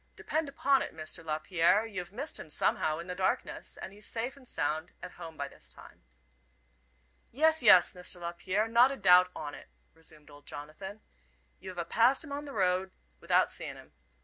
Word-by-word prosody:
Depend 315 -2 -2
upon 275 -1 +2
it, - - -5
Mr. 160 +1 -5
Lapierre, 165 +6 +2
you've 185 -5 -6
missed 275 +9 -3
him - - -9
somehow 155 +1 +1
in 170 - -7
the 180 - -5
darkness, 185 +1 -2
and 190 - -8
he's 210 +1 -5
safe 235 +4 -3
and 270 -2 -16
sound 155 -1 -2
at - - -7
home 165 -2 -10
by 140 - -3
this - - -13
time." - - -15 1.3
"Yes, 315 +4 +3
yes, 205 -7 +7
Mr. 180 0 -1
Lapierre, 185 +5 -1
not 235 +3 +5
a 275 - -5
doubt 180 -2 +6
on 145 -1 -6
it," - - -12 0.2
resumed 155 -2 -12
old 145 0 -16
Jonathan, 190 +8 -9 0.6
"you've 185 -1 -9
a 170 - -2
passed 240 - +3
him 295 - -10
on 285 +1 -4
the 285 - -8
road 185 -3 +1 0.3
athout - - +3
seein' - - -6
'im. - - -16
185 Hz, 185 wpm, -31 LUFS, 165-235 Hz, 1.3 s, yes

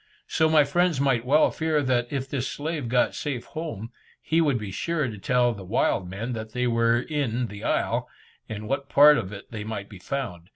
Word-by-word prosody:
So 160 0 +2
my 155 -1 +6
friends 170 +1 +1
might 135 -4 +1
well 150 +4 +4
fear 160 -2 0
that 125 -2 +1
if 135 -2 -2
this 135 -2 -2
slave 150 -4 -4
got 125 0 +2
safe 135 -5 -4
home, 140 -9 -6 0.3
he 165 +1 +1
would 145 -6 +2
be 105 -4 -6
sure 155 - -1
to 110 -3 -6
tell 125 +3 +2
the 100 -3 -9
wild 95 -2 0
men 110 +6 -4
that 110 -1 -6
they 125 0 0
were 115 0 +3
in 125 -4 -1
the 100 0 -9
isle, - - 0 0.4
and 105 -1 -5
in - - -7
what 140 +2 -2
part 150 0 +7
of 100 -4 -5
it 100 -1 -10
they 110 -3 -5
might 105 -2 -5
be 100 - -11
found. 90 -6 -5
125 Hz, 215 wpm, -25 LUFS, 110-145 Hz, 0.4 s, part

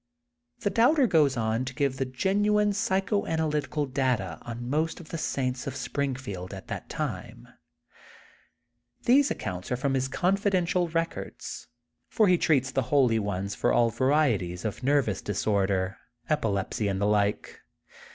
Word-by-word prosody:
The 205 -3 0
Doubter 265 +5 +4
goes 150 - +3
on 110 +1 0
to 130 0 -6
give 135 0 0
the 135 - 0
genuine 205 +9 +2
psycho 200 +1 0
analytical 150 -2 -1
data 125 - -1
on 120 0 -6
most 155 +5 -1
of 165 - -12
the 165 - -4
saints 130 -3 -2
of 135 - -4
Springfield 125 -8 -4
at 95 - -11
that - - -6
time. - - -5 1.6
These 275 +3 +5
accounts 90 +3 -5
are 125 - +1
from 135 +1 0
his 130 0 +1
confidential 180 +2 +1
records. 165 0 -4 0.4
For 215 - +3
he 180 -2 +4
treats 135 -5 +2
the 135 - +1
holy 125 -6 +4
ones 100 -1 -3
for - - +1
all 115 -1 +3
varieties 115 - +1
of 110 - -3
nerv 140 0 +2
ous 105 - -2
disorder, 100 -1 0 0.3
epilepsy, 105 -6 0
and 95 -1 -1
the 100 - +1
like. 105 -1 0
130 Hz, 150 wpm, -27 LUFS, 110-165 Hz, 1.6 s, These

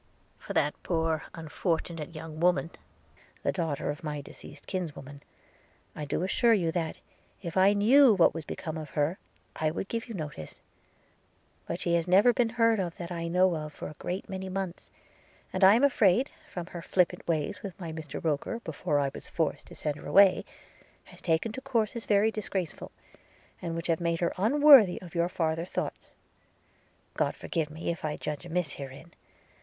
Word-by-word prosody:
'For - - -7
that 150 - +2
poor 160 -2 0
unfortunate 165 0 -3
young 155 0 -7
woman, 175 -1 +2 0.7
the - - +2
daughter 160 -5 -2
of 150 +4 -9
my 150 -2 -3
deceased 140 - -12
kinswoman, 145 -6 -5 0.7
I 150 - -4
do 145 - -1
assure 230 +4 +3
you 170 -5 0
that, 165 -2 -3 0.4
if 170 -3 -5
I 190 +2 +5
knew 235 +4 +6
what 175 - +5
was 165 - -5
become 160 +1 -5
of 155 - -7
her, 150 +5 +1 0.4
I 155 - 0
would 170 +4 -4
give 230 +1 -3
you 225 - -5
notice. 150 - -7 1.1
But - - -3
she 170 - 0
has 170 0 +1
never 200 +7 +6
been 240 -2 +2
heard 230 -2 +3
of 175 -3 -3
that 170 0 -6
I 170 -1 -3
know 180 +1 +3
of 150 -1 -5
for - - -7
a 150 - -11
great 185 +3 -4
many 190 0 -5
months 185 -2 -5 0.3
– - - -31
and 185 - 0
I 195 +3 +9
am 240 - +2
afraid, 245 -2 +4 0.2
from 175 -2 -5
her 170 - -5
flippant 180 +1 0
ways 165 +3 -1
with 200 -1 -8
my 165 -3 -5
Mr 155 -3 -7
Roker 160 +8 -1
before 150 -5 -1
I 140 -1 0
was - - -10
forced 160 -3 -2
to - - -12
send 150 -1 -2
her - - -10
away, 195 -1 +6 0.6
has - - -14
taken 165 +6 +1
to 260 - -7
courses 235 -4 -1
very 210 +1 +4
disgraceful, 195 -6 -4 0.7
and 165 -2 -3
which 165 0 -4
have 165 0 0
made 170 -1 0
her 170 - +1
unworthy 255 -1 +7
of 175 -3 -12
your 170 0 +1
farther 165 -2 -1
thoughts. - - -5 1.0
God - - 0
forgive 160 -3 -2
me 160 +2 -3
if 170 - -7
I 150 -1 -2
judge 150 +3 -5
amiss 170 -3 -1
herein! 140 +5 -9
170 Hz, 185 wpm, -29 LUFS, 160-195 Hz, 1.1 s, I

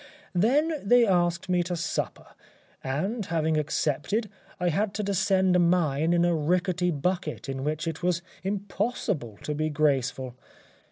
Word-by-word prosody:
Then 285 - +2
they 240 +4 +5
asked 175 -3 +1
me 180 -1 +2
to 175 0 -2
supper, 170 -1 -3 0.6
and 190 - -2
having 160 -1 +1
accepted, 155 - -1 0.3
I 180 -1 +1
had 195 +4 0
to 210 - -1
descend 190 -1 +2
a - - +5
mine 170 -3 +2
in 175 0 +3
a 175 - +3
rickety 180 +3 +1
bucket 170 0 -2
in 135 -1 -4
which 155 +2 -2
it 165 0 -4
was 175 -1 0 0.2
impossible 195 - -2
to 150 - -2
be 155 +1 -1
graceful. 135 -4 0
175 Hz, 150 wpm, -27 LUFS, 155-195 Hz, 0.6 s, they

